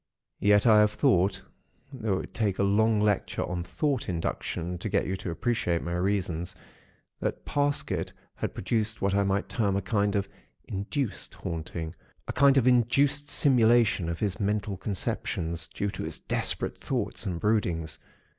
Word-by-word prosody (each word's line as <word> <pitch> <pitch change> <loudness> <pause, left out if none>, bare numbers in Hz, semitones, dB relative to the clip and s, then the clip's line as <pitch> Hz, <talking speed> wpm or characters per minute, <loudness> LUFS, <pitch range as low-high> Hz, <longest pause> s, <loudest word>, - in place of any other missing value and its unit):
Yet 105 +1 +4
I 110 -2 +7
have 105 0 +4
thought, 95 -1 +2 0.5
though 110 -6 -1
it 95 - 0
would - - -11
take 105 -4 0
a - - +2
long 110 +2 +3
lecture 105 -2 +1
on 90 -1 -3
Thought 140 - -1
Induction 85 0 -3
to - - -3
get - - +1
you 95 - -1
to 90 - -5
appreciate 85 -2 0
my 85 - -3
reasons, 90 -2 -1 0.6
that - - -3
Parsket 145 0 0 0.2
had - - -4
produced 110 +2 -1
what 100 0 +2
I 100 - +3
might 100 +1 0
term 100 -4 0
a 100 - +1
kind 100 0 +1
of 100 -1 0 0.4
'induced 100 +6 -3
haunting,' 80 0 -5 0.3
a - - -3
kind 140 0 +5
of 130 - +4
induced 135 +4 +3
simulation 120 - +4
of 85 - -2
his 100 -4 -1
mental 105 -1 -1
conceptions, 85 -4 -2
due 100 0 -3
to - - -6
his - - -3
desperate - - -1
thoughts - - -2
and 85 -3 -2
broodings. 85 -7 0
100 Hz, 165 wpm, -28 LUFS, 90-110 Hz, 0.6 s, I